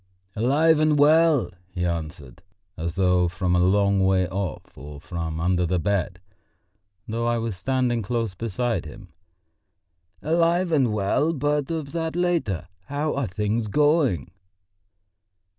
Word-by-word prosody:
"Alive 150 +8 +3
and 155 -1 +3
well," 155 - +4 0.2
he 90 -1 -3
answered, 80 -6 -5 0.3
as 85 +1 -4
though 90 -2 +2
from 90 +1 -1
a - - +3
long 100 +1 +3
way 95 -1 +2
off 95 -4 -5
or 70 +2 -10
from 80 -1 -5
under 90 +1 +1
the 90 +1 0
bed, 90 0 -1 0.9
though 115 +1 -2
I 120 0 +1
was 115 -3 -3
standing 125 +4 0
close 115 -1 -2
beside 115 +4 -2
him. 100 -6 -13 1.1
"Alive 170 +2 +2
and 135 -7 +2
well; 105 +10 +1
but 145 -1 -1
of 155 -4 -4
that 165 -1 -3
later.... 165 - -1 0.2
How 145 +2 -2
are 140 -3 -1
things 105 +4 -2
going?" 145 - +2
110 Hz, 135 wpm, -24 LUFS, 90-145 Hz, 1.1 s, well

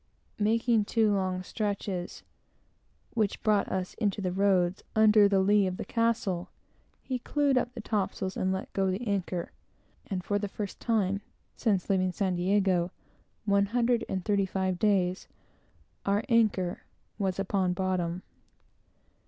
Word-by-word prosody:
Making 225 +1 +2
two 220 -1 +2
long 185 -2 -1
stretches, 200 -3 -3 0.9
which 215 -4 -1
brought 210 -2 +2
us 185 -1 -2
into 205 -3 0
the 185 -2 -1
roads, 190 -1 +2
under 215 -1 +6
the 195 -1 +3
lee 200 0 +4
of 185 0 -3
the - - -5
castle, 225 -6 0 0.5
he 255 -2 -3
clewed 285 +2 +1
up 250 0 0
the 235 - -5
topsails, 195 -3 -2
and 185 - 0
let 190 0 -4
go 195 -1 +1
the 190 +6 -2
anchor; 185 -4 -2 0.6
and 185 -3 -3
for 205 +2 0
the 205 - -2
first 200 0 -6
time 200 -4 0 0.3
since 200 -6 0
leaving 185 -2 +2
San 190 0 -1
Diego, 185 -1 +2 0.6
one 200 -1 +3
hundred 240 0 +2
and 190 -2 -3
thirty 200 -2 +2
five 190 -1 -1
days 190 -3 +1 0.8
our 200 +2 +1
anchor 210 -6 +2 0.4
was 190 -3 0
upon 190 -2 0
bottom. 180 -1 -1
195 Hz, 145 wpm, -29 LUFS, 185-215 Hz, 0.9 s, under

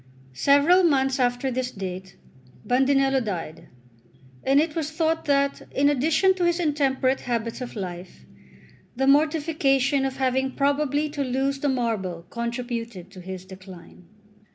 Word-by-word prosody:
Several 285 - +4
months 270 -5 +2
after 245 +1 0
this 255 0 -2
date, 185 -3 -7 0.5
Bandinello 270 +1 +2
died; 170 -6 -6 0.8
and 275 +2 +4
it 310 0 0
was 315 -3 -2
thought 320 +1 -1
that, 280 -1 +1
in 285 +1 +2
addition 310 +7 +3
to 370 -1 -3
his 345 0 +1
intemperate 275 -4 +1
habits 235 0 -3
of 250 - -6
life, 180 -3 -7 0.7
the 270 +2 0
mortification 285 -2 +2
of 270 0 -3
having 265 0 0
probably 285 +1 +1
to 290 -1 -3
lose 270 +2 -1
the 285 - 0
marble 210 -9 -2
contributed 235 -5 -5
to 185 -2 -11
his 185 0 -8
decline. 185 -2 -13
265 Hz, 135 wpm, -24 LUFS, 230-285 Hz, 0.8 s, Several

